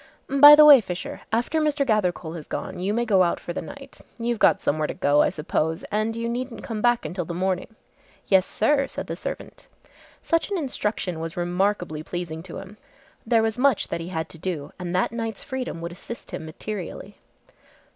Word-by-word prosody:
"By 290 +2 +10
the 300 0 +8
way, 285 -4 +10
Fisher, 180 -3 -6
after 240 +8 +1
Mr. 300 -2 +1
Gathercole 180 -8 0
has 155 -3 -8
gone, - - -5
you 190 +3 -1
may 235 +3 0
go 200 -5 +4
out 175 -2 +2
for 175 - -6
the - - -3
night. 280 -1 -11 0.2
You've 235 -1 -2
got - - +5
somewhere 155 +1 0
to - - -5
go, 145 +1 +3
I - - +3
suppose, 160 +2 -2
and 215 +2 0
you 230 0 -3
needn't 245 +1 -4
come 220 -3 -4
back 240 0 +2
until 180 0 -3
the 170 +1 -6
morning." 185 +4 -2 0.5
"Yes, 190 -1 +3
sir," 275 +5 +1
said - - -6
the - - -5
servant. - - -7 0.6
Such 330 +3 +1
an 400 - -1
instruction 210 - -2
was 165 +1 -6
remarkably 175 -2 -1
pleasing 160 -1 -5
to 175 0 -9
him. 195 +2 -10 0.5
There 225 -1 +4
was 225 +1 -1
much 270 -4 +2
that 170 - -3
he 165 - -6
had 160 -3 -3
to 165 - -11
do 160 -5 -4
and 180 0 -4
that 185 - +1
night's 225 -2 -4
freedom 255 - -5
would 170 +1 -5
assist 215 +6 -9
him 160 - -6
materially. 195 +3 -7
205 Hz, 200 wpm, -24 LUFS, 175-240 Hz, 0.6 s, By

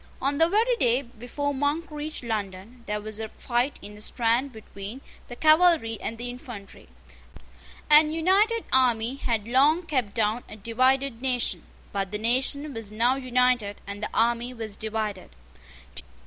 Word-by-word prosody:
On 280 +1 -1
the 325 +1 +5
very 450 +6 +3
day 250 - +2
before 245 +4 -4
Monk 290 +4 -1
reached 300 -1 -6
London, 215 +1 -5
there 210 0 -1
was 215 0 -6
a 220 -1 -4
fight 245 +5 -1
in 205 +1 -7
the 210 - -12
Strand 235 +4 +1
between 215 0 -9 0.3
the 245 - -8
cavalry 310 - +4
and 225 - -4
the 240 +1 -5
infantry. 240 - -10 1.0
An 300 +1 +8
united 395 +8 +2
army 245 -2 +3
had 230 -5 -1
long 285 +8 +4
kept 255 -11 -1
down 225 +1 +1
a - - -9
divided 255 +3 +1
nation; 255 -2 0 0.3
but 195 -1 -2
the 210 - -1
nation 265 +6 +1
was 225 -3 -6
now 235 +4 +2
united, 250 -5 +1
and 200 +1 -7
the 215 - -2
army 235 +2 +1
was 220 -3 -5
divided. 215 -3 -4
245 Hz, 155 wpm, -26 LUFS, 220-280 Hz, 1.0 s, An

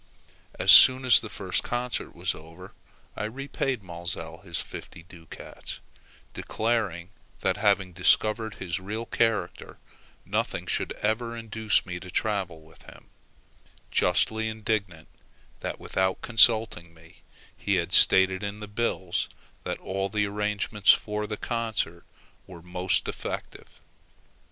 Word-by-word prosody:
As - - +5
soon 130 0 +9
as 125 - +7
the 110 - -8
first 95 -3 -1
concert 120 0 -3
was 85 +1 -2
over, 80 +4 -13 0.4
I 110 - -3
repaid 130 0 -3
Maelzel 85 -1 -4
his 85 -3 -5
fifty 85 - -8
ducats, 85 -2 -10 0.5
declaring 105 -6 -2 0.3
that - - 0
having 100 -3 +1
discovered 110 +4 +2
his 90 -2 -4
real 110 +5 -5
character, 115 -8 -1 0.5
nothing - - -2
should - - -1
ever 115 +2 -1
induce 110 -2 0
me 90 -1 -6
to 90 - -11
travel 95 -5 -2
with 80 +1 -20
him; - - -16 0.8
justly 110 0 +2
indignant 105 -7 -3 0.5
that, - - -5
without 95 0 -1
consulting 110 -7 +3
me, 80 0 -19 0.3
he 100 - -1
had 85 -1 -1
stated 95 -1 +6
in 100 0 -5
the 105 - -7
bills 105 -4 -2 0.4
that - - -3
all 95 +1 -3
the 105 +1 0
arrangements 105 0 +2
for 105 0 -1
the 105 - -5
concert 110 -8 -3 0.4
were 85 -3 -12
most 90 +1 0
defective. - - -7
100 Hz, 125 wpm, -26 LUFS, 90-110 Hz, 0.8 s, soon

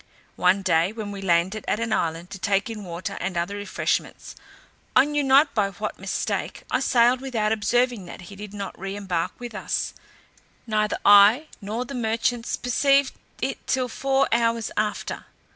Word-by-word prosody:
One 185 +2 +3
day, 170 0 +2
when 215 -2 -6
we 200 -1 -7
landed 185 +3 +1
at 210 - 0
an 230 -1 -1
island 165 +1 -2
to 195 - -7
take 200 +4 0
in 215 -2 -7
water 175 0 -5
and 180 -1 -3
other 175 +4 -1
refreshments, 205 0 -3 0.6
I 260 - +7
knew 295 0 0
not 275 +3 +5
by 205 -3 +1
what 205 +3 -5
mistake, - - -3
I - - +2
sailed 245 +1 +3
without 225 -6 -1
observing 230 0 +1
that - - -9
he 190 +3 -11
did 205 0 -8
not 200 -2 -7
re 195 +1 -5
embark 185 -5 -2
with 240 -2 -7
us; 210 - -2 0.7
neither 215 -2 0
I 205 +9 +7
nor 220 +5 -3
the 275 - -8
merchants 230 0 -1
perceived 275 +2 +2 0.3
it - - -3
till 255 -1 +1
four 270 +2 +1
hours 230 -1 +1
after. 210 -1 -2
215 Hz, 170 wpm, -24 LUFS, 195-245 Hz, 0.7 s, I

